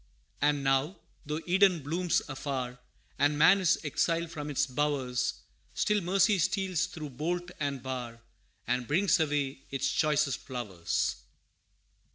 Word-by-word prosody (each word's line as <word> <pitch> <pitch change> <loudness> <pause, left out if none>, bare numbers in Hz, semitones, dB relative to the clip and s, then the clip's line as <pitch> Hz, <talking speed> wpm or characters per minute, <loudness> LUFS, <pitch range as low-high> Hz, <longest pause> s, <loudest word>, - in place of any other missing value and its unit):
And 145 -1 +2
now, 135 +7 +1 0.3
though 150 +2 -2
Eden 185 -3 +4
blooms 170 +4 0
afar, 130 -3 -4 0.4
And 145 +1 +3
man 175 +6 +6
is 175 - +3
exiled 165 +2 0
from 150 -2 -5
its 145 0 +1
bowers, 130 -2 -1 0.3
Still 210 -1 +2
mercy 195 +3 +3
steals 185 -1 +1
through 155 -3 -7
bolt 175 +6 -3
and 140 -3 -2
bar, 125 -3 -5 0.5
And 125 0 -1
brings 180 +4 +3
away 145 -3 -1
its 135 0 -1
choicest 150 -3 +1
flowers. 105 -10 -2
150 Hz, 130 wpm, -30 LUFS, 135-170 Hz, 0.5 s, man